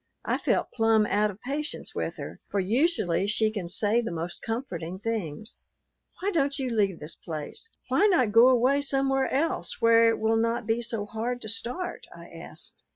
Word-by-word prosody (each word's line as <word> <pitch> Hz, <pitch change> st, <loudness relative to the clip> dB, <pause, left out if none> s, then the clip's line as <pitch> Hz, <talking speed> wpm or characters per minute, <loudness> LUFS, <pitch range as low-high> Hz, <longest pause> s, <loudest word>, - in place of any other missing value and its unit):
I -, -, 0 dB
felt -, -, 0 dB
plumb 225 Hz, -2 st, +3 dB
out 210 Hz, +1 st, +2 dB
of 200 Hz, 0 st, -9 dB
patience 290 Hz, +4 st, -4 dB
with -, -, -3 dB
her, -, -, -7 dB
for 200 Hz, -, -1 dB
usually 205 Hz, -, +1 dB
she 215 Hz, +1 st, +1 dB
can 195 Hz, -6 st, -5 dB
say 210 Hz, +5 st, +1 dB
the 230 Hz, -, -4 dB
most 170 Hz, +1 st, -5 dB
comforting 185 Hz, -8 st, -4 dB
things. 215 Hz, -2 st, -4 dB, 0.6 s
"Why 400 Hz, +2 st, -1 dB
don't 280 Hz, -5 st, +1 dB
you 260 Hz, -3 st, -2 dB
leave 200 Hz, -5 st, +1 dB
this 150 Hz, +2 st, -6 dB
place? 160 Hz, -, -7 dB, 0.2 s
Why 415 Hz, -, +4 dB
not 290 Hz, -, +3 dB
go 230 Hz, +4 st, +7 dB
away 260 Hz, +3 st, +3 dB
somewhere 270 Hz, -1 st, +1 dB
else, 305 Hz, +5 st, -1 dB
where 230 Hz, 0 st, +6 dB
it 225 Hz, -, +1 dB
will 220 Hz, +1 st, +2 dB
not 230 Hz, +1 st, 0 dB
be 225 Hz, +2 st, 0 dB
so 230 Hz, -3 st, -3 dB
hard 230 Hz, +4 st, -3 dB
to 220 Hz, -, -5 dB
start?" 250 Hz, -, -1 dB
I -, -, -12 dB
asked. -, -, -8 dB
225 Hz, 185 wpm, -27 LUFS, 205-260 Hz, 0.6 s, go